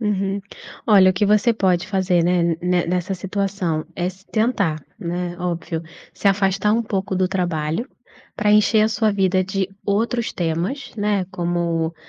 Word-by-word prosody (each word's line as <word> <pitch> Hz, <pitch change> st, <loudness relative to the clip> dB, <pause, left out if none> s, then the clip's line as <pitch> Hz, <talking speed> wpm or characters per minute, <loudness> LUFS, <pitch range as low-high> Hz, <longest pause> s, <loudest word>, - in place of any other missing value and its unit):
Uhum. 200 Hz, -2 st, -1 dB, 0.5 s
Olha, 195 Hz, -4 st, +7 dB
o -, -, 0 dB
que 200 Hz, +3 st, +1 dB
você 210 Hz, +3 st, +4 dB
pode 185 Hz, -4 st, +1 dB
fazer, 185 Hz, -3 st, +1 dB
né, 170 Hz, -2 st, +2 dB
ne 180 Hz, -1 st, +1 dB
nessa 180 Hz, +2 st, -1 dB
situação 190 Hz, -4 st, -2 dB
é 175 Hz, 0 st, -1 dB
se 190 Hz, +1 st, -12 dB
tentar, 200 Hz, -, 0 dB, 0.2 s
né. 175 Hz, 0 st, -3 dB
Óbvio, 170 Hz, -2 st, -3 dB, 0.3 s
se -, -, -4 dB
afastar 195 Hz, +1 st, +2 dB
um 230 Hz, +2 st, +2 dB
pouco 195 Hz, -3 st, -2 dB
do 185 Hz, 0 st, +1 dB
trabalho 175 Hz, -, -1 dB, 0.5 s
pra 210 Hz, 0 st, +1 dB
encher 210 Hz, +1 st, +5 dB
a 215 Hz, -, +3 dB
sua 220 Hz, -1 st, +1 dB
vida 190 Hz, -1 st, +2 dB
de 190 Hz, 0 st, -2 dB, 0.2 s
outros 230 Hz, +3 st, 0 dB
temas, 175 Hz, -, -2 dB
né, 205 Hz, -2 st, +1 dB
como: 170 Hz, -2 st, -1 dB
190 Hz, 160 wpm, -21 LUFS, 175-205 Hz, 0.5 s, Olha